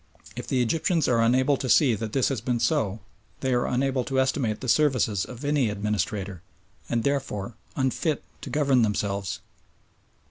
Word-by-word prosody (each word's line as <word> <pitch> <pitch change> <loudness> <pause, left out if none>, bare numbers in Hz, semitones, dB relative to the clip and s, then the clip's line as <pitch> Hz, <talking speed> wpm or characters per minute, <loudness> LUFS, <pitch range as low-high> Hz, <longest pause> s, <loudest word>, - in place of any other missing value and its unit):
If - - -6
the 125 -2 +2
Egyptians 160 +5 +1
are 115 -2 +3
unable 130 +4 +3
to 130 - -4
see 135 -3 +5
that 110 0 -4
this 130 +1 +2
has 135 -6 -2
been 120 0 -1
so, 110 -3 0 0.4
they 130 -1 +1
are 120 - +1
unable 130 0 0
to 135 -1 0
estimate 130 -5 0
the 130 - -6
services 125 -8 +2
of 125 +3 -9
any 145 -5 +2
administrator, 100 -2 -2 0.5
and 115 -1 0
therefore 130 -6 -2 0.2
unfit 140 +3 0 0.2
to - - -7
govern 140 -4 +3
themselves. 100 -4 -1
125 Hz, 165 wpm, -26 LUFS, 110-135 Hz, 0.5 s, see